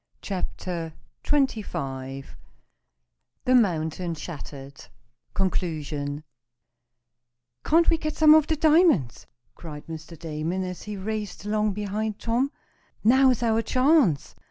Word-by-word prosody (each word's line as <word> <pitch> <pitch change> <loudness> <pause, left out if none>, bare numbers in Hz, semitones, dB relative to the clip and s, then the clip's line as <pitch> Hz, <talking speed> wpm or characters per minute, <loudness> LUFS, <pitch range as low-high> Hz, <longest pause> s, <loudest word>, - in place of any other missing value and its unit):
CHAPTER 180 -3 -4 0.3
XXV 135 - -2 1.2
THE 255 - +3
MOUNTAIN 170 -6 +1
SHATTERED 140 -3 -9 0.5
CONCLUSION 155 -6 -2 1.4
"Can't 330 +2 +4
we 330 - +3
get 310 -1 -3
some 310 -1 +8
of 310 -1 +5
the 320 - +1
diamonds?" 310 - +3 0.3
cried 150 -3 -9
Mr. 160 +1 -9
Damon, 165 +3 -3
as 180 -1 -6
he 210 -1 -6
raced 210 0 -5
along 210 0 +1
behind 210 +1 -3
Tom. 245 +4 0 0.5
"Now's 255 +1 +4
our 225 -1 +2
chance. 255 - +2
195 Hz, 105 wpm, -25 LUFS, 155-250 Hz, 1.4 s, some